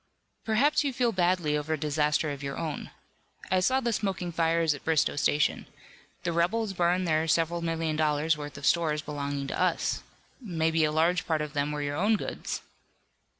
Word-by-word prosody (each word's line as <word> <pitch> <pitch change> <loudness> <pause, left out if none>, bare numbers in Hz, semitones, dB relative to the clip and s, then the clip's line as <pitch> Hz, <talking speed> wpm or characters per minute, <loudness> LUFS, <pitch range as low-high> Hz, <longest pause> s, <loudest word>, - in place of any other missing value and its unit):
"Perhaps 250 +8 +3
you 280 - 0
feel 245 -1 +1
badly 175 -5 +1
over 150 +1 -1
a - - 0
disaster 150 0 +1
of 140 -1 -6
your 140 0 -4
own. 155 -3 -4 0.6
I 185 - +4
saw 260 +8 +2
the 235 -2 0
smoking 190 -4 -2
fires 165 -1 +2
at 145 - -9
Bristoe 160 -3 +2
Station. 145 0 +1 0.6
The 175 - 0
rebels 195 +6 0
burned 180 0 +1
there 155 0 +1
several 165 +1 +1
million 165 -2 -1
dollars 155 0 +2
worth 145 -1 -7
of 140 - -6
stores 155 -3 +2
belonging 140 -2 -3
to - - -2
us. 180 -2 +1 0.4
Maybe 165 -6 +1
a 150 - 0
large 170 +4 +1
part 155 -2 +1
of 150 -1 -7
them 145 0 0
were 150 0 -3
your 145 0 -2
own 210 +5 +3
goods." - - -4
160 Hz, 185 wpm, -28 LUFS, 150-180 Hz, 0.6 s, I